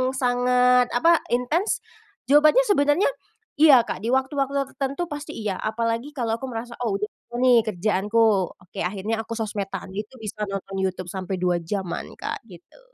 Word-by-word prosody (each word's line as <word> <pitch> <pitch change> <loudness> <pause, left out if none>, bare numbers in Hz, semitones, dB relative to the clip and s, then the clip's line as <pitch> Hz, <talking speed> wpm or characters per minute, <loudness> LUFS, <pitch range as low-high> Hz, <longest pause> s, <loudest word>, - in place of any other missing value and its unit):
sangat, 250 0 +3
apa, 335 +6 +5
intens? 270 - 0 0.5
Jawabannya 305 +12 +6
sebenarnya, 305 -4 +3 0.5
iya 280 -6 +8
Kak, - - -5
di 225 - -5
waktu-waktu 270 +1 0
ter 275 -1 0
tertentu 280 +6 -1
pasti 290 0 -6
iya, 210 -4 -3
apalagi 230 +6 -2
kalau 230 -3 -1
aku 265 - -5
merasa, 235 -1 -6
"Oh, 220 -5 0
udah 200 - -3
selesai 240 - -15
nih 245 -2 +6
kerjaanku." 210 +3 +1 0.4
Oke, 180 - -10
akhirnya 210 +4 -3
aku 230 +1 -6
sosmed-an, 200 -4 -4
itu 210 +4 -6
bisa 210 0 -4
nonton 195 0 -5
YouTube 185 -2 -2
sampai 190 0 -4
2 180 -1 +1
jam-an 180 +1 -4
Kak, - - -5
gitu. 180 - -16
230 Hz, 160 wpm, -24 LUFS, 200-265 Hz, 0.5 s, iya